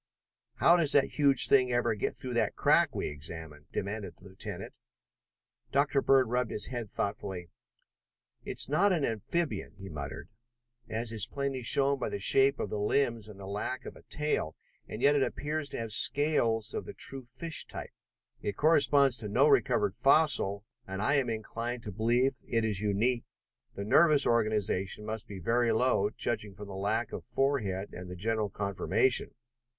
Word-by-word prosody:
"How 170 Hz, -, +5 dB
does 155 Hz, -4 st, +3 dB
that 140 Hz, +1 st, +2 dB
huge 140 Hz, -3 st, +5 dB
thing 130 Hz, -2 st, +4 dB
ever 120 Hz, -1 st, +1 dB
get 105 Hz, -, -3 dB
through 125 Hz, -1 st, -6 dB
that 120 Hz, -, 0 dB
crack -, -, +3 dB
we -, -, -2 dB
examined?" 75 Hz, 0 st, -7 dB
demanded 100 Hz, +1 st, -4 dB
the -, -, -22 dB
lieutenant. 95 Hz, -1 st, -6 dB, 0.9 s
Dr. 140 Hz, 0 st, +2 dB
Bird 135 Hz, -2 st, +4 dB
rubbed 125 Hz, 0 st, 0 dB
his 105 Hz, -, -4 dB
head 120 Hz, -5 st, -5 dB
thoughtfully. 95 Hz, -4 st, -4 dB, 0.9 s
"It's -, -, 0 dB
not 180 Hz, +9 st, +3 dB
an 160 Hz, -6 st, +1 dB
amphibian," 140 Hz, +9 st, -3 dB
he 95 Hz, -1 st, -10 dB
muttered, 75 Hz, -2 st, -7 dB, 0.6 s
"as 115 Hz, +1 st, -3 dB
is 110 Hz, -4 st, -1 dB
plainly 140 Hz, -2 st, -3 dB
shown 135 Hz, +4 st, +3 dB
by -, -, -2 dB
the -, -, -3 dB
shape 135 Hz, +7 st, +4 dB
of 100 Hz, -, -3 dB
the 105 Hz, -, -2 dB
limbs 115 Hz, 0 st, 0 dB
and 105 Hz, -2 st, -12 dB
the 95 Hz, -, -8 dB
lack 105 Hz, +6 st, -4 dB
of -, -, -8 dB
a -, -, -15 dB
tail, 150 Hz, -, -2 dB, 0.3 s
and 110 Hz, -, -7 dB
yet 145 Hz, +1 st, +5 dB
it 145 Hz, -, +2 dB
appears 150 Hz, +2 st, -2 dB
to -, -, -6 dB
have 115 Hz, -1 st, -5 dB
scales 115 Hz, -4 st, +1 dB
of -, -, -4 dB
the -, -, -9 dB
true 135 Hz, -1 st, -4 dB
fish 130 Hz, +7 st, -3 dB
type. -, -, -7 dB, 0.5 s
It 100 Hz, -, -4 dB
corresponds 145 Hz, -4 st, +4 dB
to 110 Hz, -2 st, -4 dB
no 100 Hz, -, +4 dB
recovered -, -, +2 dB
fossil, 135 Hz, -9 st, +3 dB, 0.2 s
and 95 Hz, 0 st, -5 dB
I 140 Hz, +8 st, +2 dB
am 130 Hz, -3 st, 0 dB
inclined 115 Hz, +2 st, -4 dB
to 105 Hz, -, -6 dB
believe 120 Hz, +6 st, +1 dB
it 115 Hz, -2 st, 0 dB
is 105 Hz, -3 st, +1 dB
unique. 115 Hz, +4 st, 0 dB, 0.5 s
The 100 Hz, -, -5 dB
nervous 150 Hz, +5 st, +5 dB
organisation 105 Hz, -3 st, 0 dB
must 110 Hz, 0 st, -5 dB
be 100 Hz, -, -8 dB
very 115 Hz, +6 st, +1 dB
low, 110 Hz, -3 st, +2 dB
judging 105 Hz, -2 st, -2 dB
from 100 Hz, +1 st, -9 dB
the 95 Hz, -, -7 dB
lack 100 Hz, +2 st, -1 dB
of -, -, -6 dB
forehead 105 Hz, -9 st, -1 dB
and 90 Hz, 0 st, -8 dB
the 90 Hz, -, -7 dB
general 110 Hz, +2 st, -1 dB
conformation. 100 Hz, +6 st, 0 dB
115 Hz, 175 wpm, -30 LUFS, 100-135 Hz, 0.9 s, How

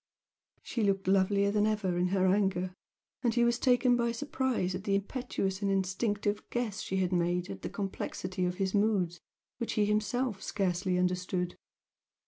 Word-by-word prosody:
She 235 Hz, -, -3 dB
looked 195 Hz, -2 st, +1 dB
lovelier 200 Hz, +1 st, +3 dB
than 210 Hz, 0 st, +2 dB
ever 210 Hz, -4 st, 0 dB
in 175 Hz, +1 st, +2 dB
her 190 Hz, 0 st, +2 dB
anger, 185 Hz, -1 st, +1 dB, 0.5 s
and 240 Hz, -3 st, +1 dB
he 240 Hz, -, +4 dB
was 235 Hz, +1 st, +2 dB
taken 250 Hz, -1 st, +4 dB
by 235 Hz, -1 st, +1 dB
surprise 260 Hz, -7 st, -1 dB
at 185 Hz, +1 st, -4 dB
the 200 Hz, -1 st, +1 dB
impetuous 200 Hz, -2 st, -2 dB
and 200 Hz, -, +1 dB
instinctive 205 Hz, +2 st, 0 dB
guess 235 Hz, -5 st, -2 dB
she 190 Hz, -, -2 dB
had 185 Hz, -1 st, +1 dB
made 175 Hz, +1 st, 0 dB
at -, -, -8 dB
the -, -, -4 dB
complexity 185 Hz, -1 st, -4 dB
of 180 Hz, 0 st, -1 dB
his 190 Hz, 0 st, -1 dB
moods, 200 Hz, -5 st, +1 dB, 0.4 s
which 235 Hz, -, -2 dB
he 210 Hz, -, +2 dB
himself 210 Hz, +1 st, 0 dB
scarcely 185 Hz, -2 st, 0 dB
understood. 180 Hz, 0 st, -1 dB
195 Hz, 165 wpm, -31 LUFS, 185-215 Hz, 0.5 s, he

